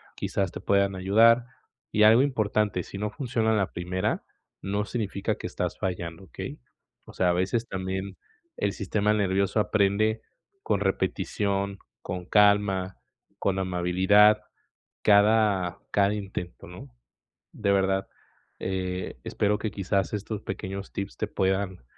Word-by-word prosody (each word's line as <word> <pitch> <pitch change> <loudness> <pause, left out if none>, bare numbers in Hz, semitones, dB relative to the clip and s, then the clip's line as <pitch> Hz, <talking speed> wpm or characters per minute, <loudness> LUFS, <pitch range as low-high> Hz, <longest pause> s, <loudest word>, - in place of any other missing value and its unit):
quizás 95 -3 -2
te - - -7
puedan 100 -1 +2
ayudar, 115 +6 +5 0.5
y 105 - +3
algo 110 +4 +7
importante, 105 -8 0
si 95 - -9
no 105 +1 -2
funciona 115 -4 0
la 100 -3 0
primera, 90 +1 -2 0.4
no 100 +2 -1
significa 100 -3 -2
que - - -5
estás - - -3
fallando, 90 -1 -4
¿okey?, 80 - -7 0.5
o - - -12
sea, 90 - +2
a 85 - +3
veces 100 +6 0
también 95 +1 -4 0.4
el 100 - 0
sistema 105 +1 0
nervioso 100 0 +1
aprende 110 +1 +2 0.4
con - - +1
repetición, 100 -1 -1 0.2
con 90 0 -5
calma, 100 - +3 0.4
con 95 -1 0
amabilidad, 95 +3 +4 0.6
cada 100 -3 +4
cada 100 0 +3
intento, 95 -4 -6
¿no?, 90 -5 -10 0.7
de 100 -2 0
verdad, 95 0 +1 0.5
eh, 95 -3 -3
espero 105 0 0
que 110 -1 -3
quizás 100 0 -1
estos 105 0 -4
pequeños 95 0 -6
tips 100 0 -4
te - - -2
puedan 95 -5 -1
100 Hz, 130 wpm, -27 LUFS, 95-105 Hz, 0.7 s, algo